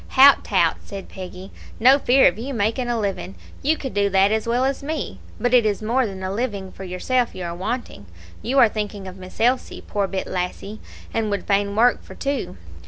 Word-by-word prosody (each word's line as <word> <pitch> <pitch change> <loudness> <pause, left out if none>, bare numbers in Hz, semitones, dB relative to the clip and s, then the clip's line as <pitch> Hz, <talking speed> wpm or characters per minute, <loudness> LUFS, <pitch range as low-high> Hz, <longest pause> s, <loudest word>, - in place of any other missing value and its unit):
"Hout 275 +1 +8
tout," - - +2
said 195 -2 -8
Peggy, 185 0 -9 0.3
"no 260 +5 +6
fear 265 0 +4
of - - 0
you 265 +3 -4
making 230 +4 0
a 235 -1 0
living, 195 -2 -3 0.3
you 310 +3 +2
could 265 - -6
do 200 0 +2
that 195 +1 +4
as 220 +1 0
well 245 +2 +2
as 270 0 -1
me; 310 +3 -4 0.2
but 245 0 0
it 245 -2 +6
is 215 0 -1
more 240 +3 +1
than 190 -2 -7
a 185 - -2
living 200 -4 -3
for 195 - -10
yourself 235 +7 -1
you 185 - -5
are 170 -1 -4
wanting; 190 - -5 0.3
you 260 +4 -1
are 240 - +8
thinking 210 -2 -5
of 185 0 -9
Miss 185 0 -12
Elsie, 250 +3 +1
poor 200 -1 -1
bit 190 0 -3
lassie, 185 +3 -4 0.3
and 225 -1 0
would 200 -2 -2
fain 200 0 +1
work 240 +3 +4
for - - -13
two. 280 0 -3
215 Hz, 215 wpm, -22 LUFS, 195-250 Hz, 0.3 s, Hout